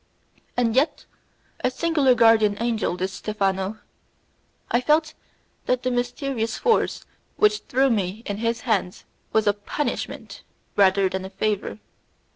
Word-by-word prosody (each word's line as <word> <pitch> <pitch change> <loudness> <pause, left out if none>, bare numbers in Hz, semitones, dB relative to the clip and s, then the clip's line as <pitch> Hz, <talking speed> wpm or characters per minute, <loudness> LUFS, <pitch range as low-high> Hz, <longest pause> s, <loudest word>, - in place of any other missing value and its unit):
And 235 -2 +1
yet, 275 +5 +1 0.6
a - - +3
singular 280 -2 +2
guardian 220 -3 +5
angel, 225 -6 -1
this 185 +1 -2
Stephano! 195 0 -2 0.9
I 240 - +3
felt 310 +4 +2 0.5
that 250 0 +1
the 255 - 0
mysterious 245 -1 -2
force 455 -2 +1 0.3
which 420 0 +4
threw 265 +1 +3
me 205 0 -1
in 205 - -3
his 230 +1 -1
hands 195 -6 -1 0.3
was 220 - +2
a 205 - +4
punishment 205 +8 -4 0.3
rather 195 -1 +4
than 190 0 -4
a 190 - -6
favour. 205 - -2
225 Hz, 130 wpm, -24 LUFS, 200-255 Hz, 0.9 s, guardian